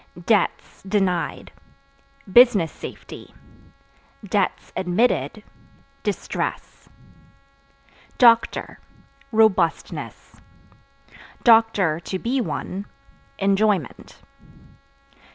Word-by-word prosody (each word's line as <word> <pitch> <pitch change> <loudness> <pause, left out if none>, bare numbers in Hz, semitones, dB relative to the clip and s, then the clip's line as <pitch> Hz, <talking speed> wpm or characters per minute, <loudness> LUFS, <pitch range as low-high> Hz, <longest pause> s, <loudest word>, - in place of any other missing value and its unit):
Debts 210 -5 0
(Denied) 190 -3 -2 0.8
business 235 -10 +6
safety; - - -11 1.4
(admitted) 190 +7 0 0.6
distress. - - -5 1.3
Doctor 235 -2 +3 0.5
Robustness; 215 -7 0 1.0
(to 200 -7 +3
be 255 +5 -1
one) 190 +2 -5 0.5
enjoyment. 195 - -1
200 Hz, 45 wpm, -22 LUFS, 180-225 Hz, 1.4 s, business